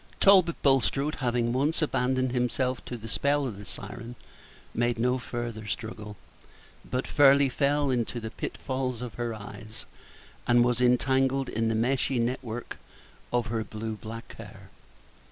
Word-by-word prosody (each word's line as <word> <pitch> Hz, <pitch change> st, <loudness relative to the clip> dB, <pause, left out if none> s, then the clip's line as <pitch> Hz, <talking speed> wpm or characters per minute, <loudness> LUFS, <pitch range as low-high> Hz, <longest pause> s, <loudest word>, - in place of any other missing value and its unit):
Talbot 185 Hz, -4 st, +6 dB
Bulstrode, 140 Hz, +2 st, +3 dB
having 120 Hz, -2 st, 0 dB
once 145 Hz, +6 st, +1 dB
abandoned 130 Hz, -4 st, +1 dB
himself 125 Hz, +1 st, 0 dB
to 120 Hz, -, -5 dB
the 115 Hz, 0 st, -9 dB
spell 140 Hz, +5 st, +1 dB
of 110 Hz, -6 st, -5 dB
the 105 Hz, -, -9 dB
siren, 120 Hz, +2 st, -7 dB, 0.6 s
made 120 Hz, 0 st, +1 dB
no 125 Hz, +3 st, +1 dB
farther 120 Hz, -3 st, -5 dB
struggle, 105 Hz, -1 st, -5 dB, 0.7 s
but 125 Hz, +1 st, -2 dB
fairly 140 Hz, -1 st, +5 dB
fell 140 Hz, +1 st, +1 dB
into 120 Hz, -1 st, -1 dB
the 110 Hz, -1 st, -6 dB
pitfalls 130 Hz, -2 st, -3 dB
of 120 Hz, -, -6 dB
her 120 Hz, -2 st, -3 dB
eyes, 110 Hz, +2 st, -9 dB, 0.6 s
and 120 Hz, 0 st, +5 dB
was 125 Hz, 0 st, +1 dB
entangled 130 Hz, +2 st, +3 dB
in 115 Hz, +1 st, 0 dB
the 115 Hz, -, +1 dB
meshy 125 Hz, +3 st, +1 dB
net 120 Hz, +2 st, 0 dB
work 120 Hz, 0 st, -6 dB, 0.5 s
of 120 Hz, -1 st, +1 dB
her 110 Hz, -1 st, 0 dB
blue 110 Hz, +1 st, -5 dB
black 115 Hz, +2 st, -8 dB
hair. -, -, -12 dB
125 Hz, 150 wpm, -28 LUFS, 115-135 Hz, 0.7 s, Talbot